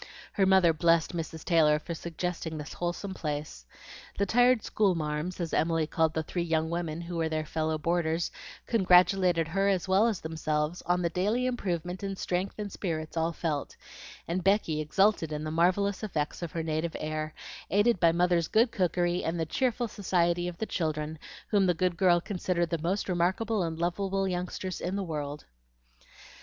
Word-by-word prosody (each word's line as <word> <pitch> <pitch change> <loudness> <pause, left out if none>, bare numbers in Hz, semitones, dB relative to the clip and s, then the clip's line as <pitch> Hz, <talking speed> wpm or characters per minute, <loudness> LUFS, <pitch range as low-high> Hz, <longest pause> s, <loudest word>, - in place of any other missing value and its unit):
Her 195 -2 +3
mother 190 -3 +5
blessed 165 +1 +2
Mrs. 160 -1 -5
Taylor 155 -4 +4
for 170 +3 -6
suggesting 170 -1 -4
this 150 0 -7
wholesome 175 +3 -3
place. 150 - -5 0.5
The 200 - +2
tired 245 +1 +4
"school 200 -4 +2
marms," 155 +3 -3
as 170 -2 -3
Emily 165 0 +2
called 160 +1 0
the 160 - 0
three 175 +3 -3
young 160 -1 0
women 170 -1 -3
who 170 0 -5
were 160 -1 0
their 155 0 -2
fellow 155 0 -1
boarders, 165 +1 0 0.3
congratulated 180 -4 +4
her 195 +3 +1
as 190 -2 0
well 195 +4 +4
as 220 -5 -1
themselves 155 0 -2
on 180 0 +2
the 170 - 0
daily 210 +8 0
improvement 180 -7 -2
in 195 -1 -3
strength 185 +1 -2
and 205 -2 -5
spirits 160 -5 -4
all 165 0 +1
felt; 155 -4 -3 0.5
and 175 +2 -2
Becky 195 -6 +2
exulted 170 +1 +2
in 150 0 -3
the 155 - -3
marvellous 185 +4 +2
effects 160 -9 -3
of 170 -3 -4
her 165 - -2
native 160 +1 -2
air, 155 0 -3 0.3
aided 205 +1 +3
by 170 -1 +5
mother's 175 -1 +2
good 230 +2 +3
cookery 175 -1 0
and 165 +1 -2
the 165 - 0
cheerful 245 - 0
society 175 -4 0
of 175 -1 -6
the 220 - -2
children, 155 -4 -2 0.3
whom 200 -3 +3
the 180 - +2
good 180 +1 0
girl 175 -1 +4
considered 175 -2 -2
the 170 - 0
most 180 +6 -1
remarkable 190 +4 0
and 165 -2 -2
lovable 195 +3 -1
youngsters 180 0 -3
in 180 +2 -2
the 200 - -1
world. 150 -4 -5
175 Hz, 180 wpm, -29 LUFS, 160-190 Hz, 0.5 s, mother